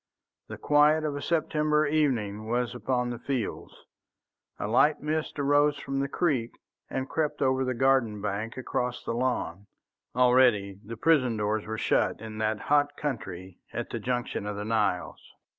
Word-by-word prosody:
The - - -7
quiet 150 +1 +4
of 150 -2 -2
a 145 - -4
September 155 -2 +1
evening 115 -9 0
was 120 +1 0
upon 125 0 -1
the 120 - -5
fields, 125 -4 -4 0.7
a - - -3
light 145 +7 +4
mist 155 +1 -2
rose 145 +1 +3
from 135 -1 -3
the 140 - 0
creek 135 -6 0 0.4
and 130 0 -3
crept 150 -1 -1
over 130 -1 +2
the 130 -1 -1
garden 130 -5 +2
bank 105 +3 -3
across 125 -1 -2
the - - -3
lawn. 115 -6 -2 0.5
Already 125 -6 +4
the 115 +2 -8
prison 130 -5 +3
doors 105 0 -1
were 110 0 -3
shut - - +1
in 110 0 -8
that 110 -1 0
hot 145 0 +2
country 95 -10 -5
at - - -4
the - - -3
junction 120 -4 -2
of 105 - -3
the 105 +1 -4
Niles. 105 -5 0
125 Hz, 160 wpm, -28 LUFS, 110-145 Hz, 0.7 s, quiet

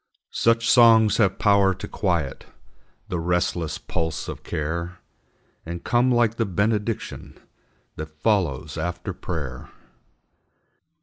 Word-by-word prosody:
Such 115 0 +2
songs 115 -3 +6
have 100 -4 +2
power 100 -2 +3
to - - -7
quiet 85 -8 -2 0.6
The 90 - -2
restless 85 -1 -1
pulse 80 -1 -3
of - - -6
care, 85 +4 -4 0.7
And 85 +1 -7
come 120 +1 +2
like 120 -2 +2
the 115 - +1
benediction 105 +4 -2 0.6
That 80 - -5
follows 80 - -1
after 90 +2 -4
prayer. 70 -8 -6
90 Hz, 110 wpm, -24 LUFS, 80-110 Hz, 0.7 s, songs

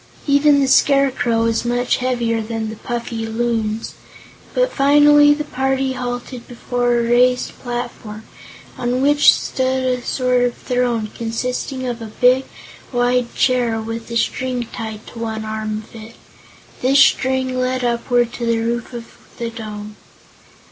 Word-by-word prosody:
Even 285 0 +4
the 275 - +2
Scarecrow 265 -4 +3
was 230 0 0
much 245 +1 0
heavier 240 -3 -1
than 220 0 -4
the - - -7
puffy 235 0 -4
Loons. 225 -1 -2 0.6
But - - +1
finally 290 +1 +6
the 300 - -3
party 265 -1 -1
halted 245 -1 -5
before 245 0 -1
a 235 - +1
raised 250 +2 +2
platform, 240 -3 -6 0.6
on 245 +2 0
which 290 +1 +6
stood 260 0 -1
a 250 -1 0
sort 250 0 0
of 245 -1 0
throne, 240 -4 -1
consisting 250 +3 -3
of 240 -2 -4
a 225 - -6
big, 255 +2 +4 0.5
wide 245 -1 0
chair 245 -3 +1
with 225 +1 -6
a 235 - -1
string 250 0 -1
tied 220 -1 -6
to 230 - -11
one 220 -1 -4
arm 215 0 -4
of 220 - -18
it. 225 +1 -11 0.7
This 265 +2 +3
string 260 -1 +3
led 255 0 -1
upward 240 0 +1
to 240 - -4
the 230 0 +2
roof 235 +2 -3
of 235 -1 -6 0.3
the 235 -1 -4
dome. 210 -2 -8
245 Hz, 150 wpm, -19 LUFS, 230-255 Hz, 0.7 s, finally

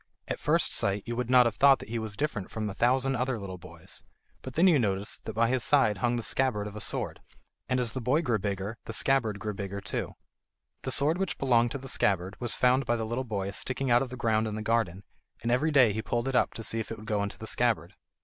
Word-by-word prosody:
At - - -3
first - - +1
sight 100 0 0
you 120 0 -4
would 125 0 -3
not 125 -1 +6
have 115 -3 -1
thought 140 -1 +6
that - - -11
he 115 0 -2
was 110 -2 -2
different 140 -10 -3
from 110 -1 -4
a 100 - -4
thousand 130 +5 +2
other 125 0 -1
little 95 -3 -7
boys; - - -10 0.4
but - - -8
then 170 - +4
you 165 -6 +5
noticed 100 -3 -2
that 110 - -5
by 115 +1 +3
his 125 0 0
side 110 -9 +3
hung 120 +3 +1
the 120 - -2
scabbard 110 -2 0
of 105 0 -7
a 105 - -4
sword, 95 - -2 0.5
and 125 - +1
as 120 -3 +1
the 130 - -4
boy 135 +8 +1
grew 120 -7 0
bigger 100 +3 -4
the 115 - -6
scabbard 115 -5 +1
grew 105 +1 -4
bigger 100 0 -5
too. - - -4 0.7
The 130 - -3
sword 150 +7 +5
which 195 -3 -2
belonged 120 -3 +3
to - - -2
the 135 0 -10
scabbard 95 -5 0
was 120 -1 +1
found 125 +1 +2
by 120 - +2
the 115 -1 -2
little 120 +4 -2
boy 100 -4 -3
sticking 130 +4 -2
out 120 +1 +5
of 135 - -3
the 125 - -8
ground 110 -2 +1
in 105 - -4
the 110 - -4
garden, 110 -5 0 0.4
and 120 - 0
every 125 +6 +2
day 130 -8 +5
he 110 - -2
pulled 120 +3 -2
it 135 - -1
up 125 - +2
to 115 - -6
see 115 - -1
if 110 - -4
it 115 - -5
would 110 - -11
go 105 -1 0
into 100 0 -4
the 110 - -8
scabbard. 120 0 0
115 Hz, 265 wpm, -28 LUFS, 105-130 Hz, 0.7 s, not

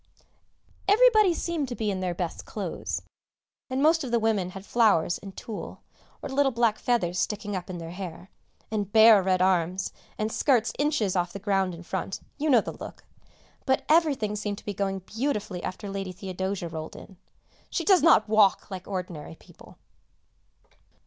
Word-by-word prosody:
Everybody 430 -2 +6
seemed 325 -5 -2
to 245 - -5
be 215 -3 -1
in 190 - -3
their 180 -2 -2
best 175 -1 -4
clothes, - - -4 0.7
and 260 +2 0
most 320 +1 +4
of 260 - -4
the 235 - +2
women 215 -5 +1
had 195 +1 -9
flowers 210 -9 +3
and 195 -1 -11
tulle 220 - -7 0.4
or 285 - -4
little 270 0 +2
black 235 -3 +1
feathers 185 -8 0
sticking 205 -1 -2
up 185 0 -5
in 180 - -5
their 165 -1 -7
hair, 180 0 -8 0.4
and 205 -2 -2
bare 220 -1 +8
red 185 -1 +2
arms, 185 0 +1 0.2
and 215 +1 -1
skirts 240 -4 +2
inches 285 -10 +1
off 175 -1 0
the - - -5
ground 195 -2 0
in 170 - -11
front; 190 +2 -4 0.2
you 305 +2 0
know 245 -5 +6
the - - -5
look. - - -10 0.6
But 265 - +2
everything 290 -10 +3
seemed 205 -1 -3
to - - -13
be 205 - -3
going 195 -1 -2
beautifully 215 -7 -3
after 185 +3 -5
Lady 195 -1 -4
Theodosia 190 0 -4
rolled 160 -1 -7
in 190 - -12 0.5
(she - - -2
does 380 -3 +5
not 305 -9 +5
walk, 210 -2 +3
like 185 -1 -7
ordinary 180 -5 -5
people)! - - -17
205 Hz, 175 wpm, -27 LUFS, 185-240 Hz, 0.7 s, bare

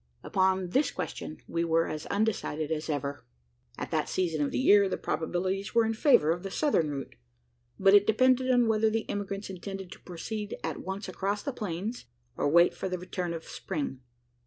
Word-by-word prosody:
Upon 190 -1 +1
this 275 +11 +2
question 85 - -5
we 170 0 -1
were 165 0 +2
as 155 0 -5
undecided 195 -8 -1
as 155 0 -2
ever. 145 -2 -3 0.5
At - - -5
that - - 0
season 165 -5 0
of 140 - 0
the - - -3
year, 205 -6 +5
the - - -1
probabilities 185 +5 -2
were 230 -1 +5
in 225 - 0
favour 215 - +4
of 175 +1 -1
the 195 - -5
southern 190 - +1
route; 140 -2 -5 0.6
but 195 0 +6
it 205 0 +7
depended 255 +3 +4
on 245 -2 +4
whether 220 0 +3
the 225 0 -2
emigrants 200 0 -4
intended 190 0 -7
to - - -10
proceed 205 +4 -5
at - - -2
once 190 +2 -5
across 200 +2 -2
the 280 - -3
plains, 205 - -4 0.3
or - - +1
wait 170 +3 +5
for 190 - -4
the 180 - -2
return 180 0 -4
of 165 -1 -5
spring. 145 -7 -4
190 Hz, 190 wpm, -29 LUFS, 165-210 Hz, 0.6 s, it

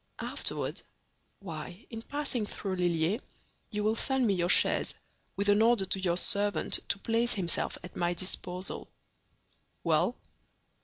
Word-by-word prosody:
"Afterward? - - -3 0.6
Why, 175 +2 -7
in 225 -1 -5
passing 275 -4 -2
through 190 -2 -4
Lilliers 175 - +1 0.5
you 210 -1 -2
will 215 +1 +2
send 265 +2 +2
me 205 - +3
your 175 -1 +1
chaise, - - +3 0.4
with 200 +1 -1
an 205 +1 +5
order 230 -3 +4
to 190 +1 +1
your 175 -2 +1
servant 205 +1 +2
to - - +2
place 230 +3 +2
himself 175 -4 0
at 180 - -10
my 175 0 0
disposal." 180 0 -3 0.9
"Well." - - +2
200 Hz, 140 wpm, -30 LUFS, 180-225 Hz, 0.9 s, an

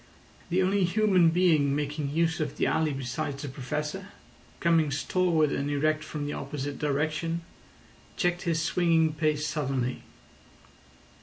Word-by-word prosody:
The 185 +2 +2
only 195 +1 +2
human 185 -2 +4
being 160 -5 +3
making 145 0 -2
use 160 +2 +1
of 150 -3 -3
the - - +1
alley 160 -1 +1
besides 135 +2 -4
the - - -4
Professor, 150 +8 -4 0.5
coming 165 -3 +3
stalwart 160 +1 +1
and 140 +1 -1
erect 155 +2 +1
from 150 -1 -5
the 145 - -3
opposite 140 0 -5
direction, 155 +3 -1 0.8
checked 175 0 +1
his 165 -3 0
swinging 165 -1 +2
pace 155 -1 0
suddenly. 135 -5 -2
155 Hz, 135 wpm, -28 LUFS, 145-170 Hz, 0.8 s, human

